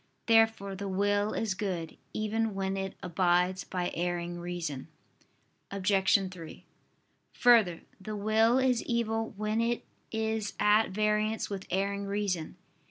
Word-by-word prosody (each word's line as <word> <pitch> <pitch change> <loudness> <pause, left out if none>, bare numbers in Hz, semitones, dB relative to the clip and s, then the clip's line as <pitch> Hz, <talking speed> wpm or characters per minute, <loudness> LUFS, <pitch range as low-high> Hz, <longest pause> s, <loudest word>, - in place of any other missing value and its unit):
Therefore 225 -3 +3
the 200 +1 -5
will 205 +2 +1
is 220 -4 -1
good, 185 -4 -4 0.2
even 215 0 -1
when 195 0 -1
it 195 0 -4
abides 180 +1 +1
by 180 -1 -3
erring 175 0 -2
reason. 170 -6 -4 0.8
Obj. 195 0 +3
3: 165 -3 -10 0.7
Further, 220 -9 +4 0.2
the 215 +2 -6
will 220 +3 +3
is 260 -2 +2
evil 225 -2 -1
when 215 +2 0
it 235 +1 -1 0.3
is 220 -1 -1
at 210 +2 +4
variance 215 +2 0
with 195 -2 -5
erring 200 +2 -1
reason. 195 -5 -2
200 Hz, 125 wpm, -30 LUFS, 185-220 Hz, 0.8 s, Further